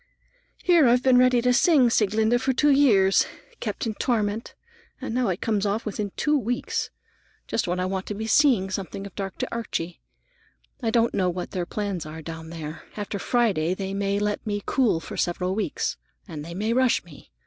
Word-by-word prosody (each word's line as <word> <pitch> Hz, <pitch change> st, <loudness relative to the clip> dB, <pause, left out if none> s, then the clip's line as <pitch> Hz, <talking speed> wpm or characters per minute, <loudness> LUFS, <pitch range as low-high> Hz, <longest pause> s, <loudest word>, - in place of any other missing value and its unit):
"Here 340 Hz, -6 st, +5 dB
I've 245 Hz, +1 st, +4 dB
been 255 Hz, -1 st, +5 dB
ready 250 Hz, -1 st, +4 dB
to 250 Hz, 0 st, +3 dB
sing 270 Hz, -2 st, +4 dB
Sieglinde 220 Hz, +3 st, +2 dB
for 265 Hz, -, +1 dB
two 295 Hz, +3 st, +3 dB
years, 210 Hz, -9 st, +4 dB, 0.3 s
kept -, -, -3 dB
in 225 Hz, -, -2 dB
torment, 215 Hz, -1 st, -1 dB, 0.4 s
and -, -, -5 dB
now 250 Hz, 0 st, +1 dB
it 180 Hz, -1 st, -2 dB
comes 215 Hz, -3 st, 0 dB
off 210 Hz, +2 st, -1 dB
within 205 Hz, -1 st, -3 dB
two 300 Hz, 0 st, +2 dB
weeks, 245 Hz, -2 st, -1 dB, 0.6 s
just 220 Hz, -, -1 dB
when 180 Hz, +1 st, -1 dB
I 180 Hz, -, 0 dB
want 190 Hz, 0 st, -3 dB
to 210 Hz, -, -4 dB
be 220 Hz, +2 st, -4 dB
seeing 225 Hz, -6 st, +3 dB
something 195 Hz, +1 st, -4 dB
of 200 Hz, -, -9 dB
Dr. 195 Hz, -1 st, -4 dB
Archie. 180 Hz, -7 st, -4 dB, 0.8 s
I 230 Hz, -, 0 dB
don't 230 Hz, 0 st, +2 dB
know 185 Hz, -2 st, +1 dB
what 180 Hz, 0 st, -4 dB
their 180 Hz, -2 st, -3 dB
plans 200 Hz, -7 st, -3 dB
are 160 Hz, +1 st, -8 dB
down 160 Hz, 0 st, -7 dB
there. 160 Hz, -1 st, -7 dB, 0.2 s
After 205 Hz, -1 st, -4 dB
Friday 195 Hz, -10 st, +1 dB
they 195 Hz, 0 st, -4 dB
may 200 Hz, 0 st, 0 dB
let 210 Hz, 0 st, -1 dB
me 205 Hz, -2 st, -3 dB
cool 235 Hz, -11 st, +2 dB
for -, -, -8 dB
several 180 Hz, +1 st, -1 dB
weeks, 215 Hz, +2 st, -2 dB, 0.3 s
and 155 Hz, -5 st, -7 dB
they 170 Hz, +2 st, -8 dB
may 215 Hz, +4 st, 0 dB
rush 255 Hz, 0 st, +2 dB
me. 160 Hz, -5 st, -15 dB
205 Hz, 190 wpm, -25 LUFS, 185-240 Hz, 0.8 s, Here